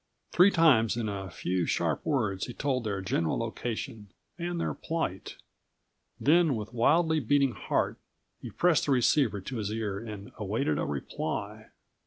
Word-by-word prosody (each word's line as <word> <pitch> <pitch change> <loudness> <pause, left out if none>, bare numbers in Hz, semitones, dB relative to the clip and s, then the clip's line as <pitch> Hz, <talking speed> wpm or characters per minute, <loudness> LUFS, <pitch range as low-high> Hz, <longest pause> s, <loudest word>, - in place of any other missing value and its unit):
Three 180 +3 +6
times 135 - +4
in 115 -2 -1
a 100 -2 -4
few 90 0 -2
sharp 80 -4 0
words 110 -10 0
he 120 - -8
told 130 -3 -1
their 100 -2 -2
general 85 -4 0
location 115 -1 -4 0.3
and 175 0 -3
their - - -1
plight. 160 - -4 0.8
Then158 160 -1 +4
with 105 +2 -7
wildly 160 +7 +3
beating 140 +1 +2
heart, 100 - -1 0.4
he - - -7
pressed 175 -4 +2
the - - +2
receivers 120 -5 +2
to 130 - -4
his 105 -2 -2
ears 110 0 -3
and 105 +3 -8
awaited 100 -7 -1
a - - 0
reply. 70 -2 -4
115 Hz, 155 wpm, -29 LUFS, 100-145 Hz, 0.8 s, Three